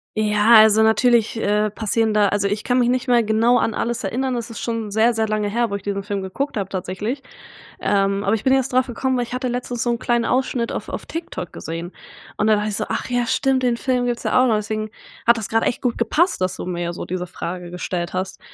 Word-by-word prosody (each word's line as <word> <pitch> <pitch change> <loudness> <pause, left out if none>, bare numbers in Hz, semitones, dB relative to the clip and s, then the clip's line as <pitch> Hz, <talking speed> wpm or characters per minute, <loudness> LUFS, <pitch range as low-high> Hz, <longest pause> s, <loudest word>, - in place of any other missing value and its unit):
Ja, 215 +1 +4
also 220 0 +7
natürlich, 225 0 +3
äh, 210 0 +1
passieren 220 +1 0
da 210 -1 +4
also, 200 0 0
ich 205 +1 -2
kann 250 0 +1
mich 245 -1 +3
nicht 255 +1 0
mehr 240 -1 +4
genau 225 +3 +3
an 225 - 0
alles 235 -1 -2
erinnern. 250 +6 -1
Es 235 -1 -4
ist 230 - -7
schon 230 -2 -3
sehr, 220 +3 +3
sehr 220 -1 0
lange 215 -1 -1
her, 235 +3 0
wo 200 - -3
ich 200 - -6
diesen 200 -1 -2
Film 200 -1 -3
geguckt 270 +8 -3
habe 195 -2 -2
tatsächlich, 190 +8 -4 0.6
ähm, 195 0 +1
aber 200 - +1
ich 220 - -1
bin 260 - +3
jetzt 265 -1 +1
draufgekommen, 255 +1 +1
weil 245 - 0
ich 240 - -10
hatte 255 +1 -2
letztens 245 -1 -3
so 240 - +1
'n 235 - -2
kleinen 240 -1 +1
Ausschnitt 250 -1 0
auf - - -5
auf - - -5
TikTok 320 - -6
gesehen, 165 +2 -6 0.5
und 210 - +1
dann 215 -1 +5
dachte 210 +1 -1
ich 205 - -2
so: 215 - -2
„Ach - - -2
ja, 245 -1 0
stimmt, 265 +3 +1
den 240 -2 +2
Film 250 0 0
gibt's 240 -1 -2
ja 255 - +3
auch - - +3
noch.“ 225 - +3
Deswegen 215 0 -3 0.4
hat 235 0 +6
das 220 - -4
grad 225 0 +2
echt - - -1
gut 245 -2 0
gepasst, 305 - +1
dass 185 0 0
du - - -5
mir 175 -1 -3
so - - -6
diese 180 0 -4
Frage 175 0 -6
gestellt 175 0 -4
hast, 185 +1 -3
220 Hz, 250 wpm, -21 LUFS, 200-245 Hz, 0.6 s, also